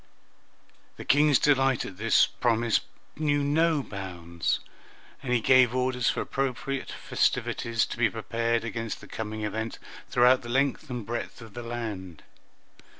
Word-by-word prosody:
The - - -8
King's 145 -1 +5
delight 135 -3 +2
at 95 - -9
this 115 +2 +4
promise 115 -1 +1 0.4
knew 145 -2 +1
no 155 +1 +2
bounds, 85 -5 -3 0.6
and 125 - -4
he 125 - +4
gave 130 +1 +5
orders 125 -1 +1
for - - -1
appropriate 135 0 -3
festivities 115 -1 0
to - - -7
be 115 -2 +4
prepared 115 +1 -1
against 115 -1 -4
the - - -13
coming 110 -1 -5
event 110 +2 -3 0.3
throughout 125 +1 +5
the 120 - -9
length 135 +3 0
and 120 -4 -4
breadth 120 +2 -5
of 115 -3 -12
the 120 - -6
land. 110 -8 -6
120 Hz, 145 wpm, -27 LUFS, 110-135 Hz, 0.6 s, King's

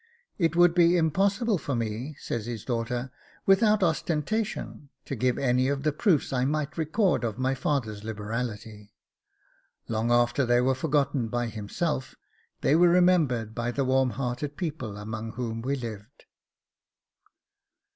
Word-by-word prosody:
'It 165 -2 +2
would 175 -1 +5
be 175 0 +5
impossible 195 +6 +1
for 140 - -3
me,' 115 +6 -3
says 115 -1 -4
his 115 -4 -5
daughter, 120 +1 -2 0.3
'without 210 +1 +4
ostentation 165 0 -2 0.2
to 135 - -4
give 125 +1 +1
any 130 -1 +2
of 140 0 -1
the 155 - +2
proofs 155 - +1
I 125 -1 +1
might 150 +2 -1
record 165 - +1
of 110 -2 -2
my 130 +1 +1
father's 120 -7 -2
liberality. 110 -1 -5 0.9
Long 115 +1 -1
after 120 +3 +3
they 120 0 +3
were 130 +2 +3
forgotten 140 -2 0
by 120 +1 -2
himself, 130 +6 -3 0.5
they 145 - +3
were 175 +1 +6
remembered 165 -11 +3
by 120 +1 -2
the 135 +2 -1
warm 130 0 +3
hearted 135 +3 -3
people 145 - -4
among 110 +2 -6
whom 115 -2 -4
he 140 - +2
lived. 115 -1 -8
130 Hz, 145 wpm, -27 LUFS, 115-160 Hz, 0.9 s, were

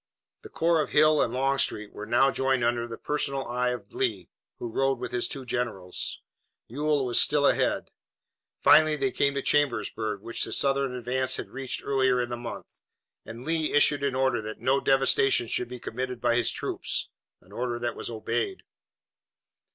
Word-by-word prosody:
The - - -11
corps 165 -1 +2
of - - -5
Hill 155 0 +5
and 115 - +1
Longstreet 130 -5 0
were 105 - -7
now 135 +4 +4
joined 130 -2 0
under 120 0 0
the 115 -1 -7
personal 140 -2 -2
eye 125 +1 0
of 120 -5 -6
Lee, 95 -6 -2 0.3
who - - -5
rode 135 +3 0
with 125 - -6
his 120 - 0
two 135 -2 -7
generals. 110 -8 -2 0.4
Ewell 145 +2 0
was 120 -1 +4
still 145 -1 +3
ahead. - - +1 0.7
Finally 155 0 +6
they 195 +6 -1
came 140 -5 +1
to 140 - -2
Chambersburg, 110 -6 0
which 115 +2 -1
the - - -3
Southern 135 -2 +1
advance 130 +1 -1
had - - -6
reached 135 0 -4
earlier 130 -2 +2
in 120 -1 -1
the 120 - -3
month, 120 0 -9 0.5
and 115 +3 -9
Lee 160 -1 0
issued 145 0 +4
an 140 -2 0
order 130 -3 +1
that 110 0 -7
no 135 +1 +1
devastation 135 -3 +3
should 120 +1 -1
be 125 0 -7
committed 125 +1 -5
by 120 0 +2
his 120 -1 +2
troops, - - -2 0.3
an 90 - -21
order 120 +2 -3
that 120 0 -3
was - - -6
obeyed. 245 - -3
125 Hz, 180 wpm, -27 LUFS, 120-140 Hz, 0.7 s, Finally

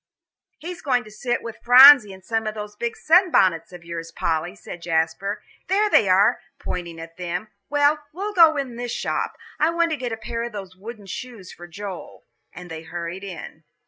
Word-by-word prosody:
"He's 350 +1 -8
going 250 -4 +1
to 215 - -14
sit 240 +3 -3
with 230 -1 -8
Phronsie 250 -3 +9
in 190 -1 -13
some 225 +2 -2
of 215 - -4
those 210 -1 -7
big 235 +2 -4
sunbonnets 310 - +3
of 175 -1 -12
yours, 165 -1 -6
Polly," 165 +3 -2
said 175 -3 -10
Jasper. 170 +5 -1 0.2
"There 410 +2 +2
they 200 - +4
are," 195 +3 +4 0.2
pointing 170 -2 -6
to 165 0 -9
them. 180 +4 -4 0.2
"Well, 290 +1 +3
we'll 400 +6 -5
go 325 -5 +6
in 260 -4 -4
this 245 -1 -4
shop. - - -3 0.2
I 310 - +3
want 335 0 +1
to 310 - -1
get 250 -3 -4
a 225 - -4
pair 230 +1 -5
of 235 0 -5
those 190 -3 -8
wooden 210 +2 -10
shoes 220 -2 -8
for 175 - -12
Joel." 195 +1 -9 0.3
And 175 -1 -11
they 160 -1 -6
hurried 170 +3 -6
in. 175 -4 -9
210 Hz, 195 wpm, -23 LUFS, 175-255 Hz, 0.3 s, Phronsie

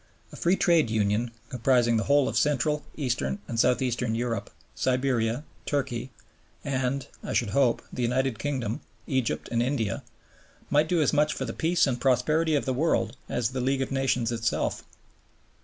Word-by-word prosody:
A - - -10
Free 175 +3 +2
Trade 170 - +3
Union, 110 +2 +1 0.2
comprising 120 -1 +2
the 110 - 0
whole 145 -1 +4
of - - -3
Central, 150 +1 +1
Eastern, 135 +6 -1
and 115 - -3
South 125 +3 +3
Eastern 120 -2 -1
Europe, 115 -3 -2 0.2
Siberia, 125 -1 0 0.2
Turkey, 130 -3 -2 0.5
and 135 -1 -1 0.2
(I - - -4
should 115 -5 +1
hope) 125 0 +2
the - - -3
United 125 -1 0
Kingdom, 130 -6 -2 0.2
Egypt, 130 -4 -1
and 115 0 +1
India, 120 -5 -1 0.7
might 150 +2 +3
do 170 -3 +3
as 145 - +1
much 150 +1 +2
for - - -3
the - - -4
peace 170 +2 +2
and 125 -3 -2
prosperity 150 +5 +2
of 145 - 0
the 130 - 0
world 155 +1 +1
as 120 0 0
the 130 -1 -2
League 135 +1 +1
of 135 - -6
Nations 130 -3 +1
itself. 115 0 -1
130 Hz, 170 wpm, -27 LUFS, 120-145 Hz, 0.7 s, whole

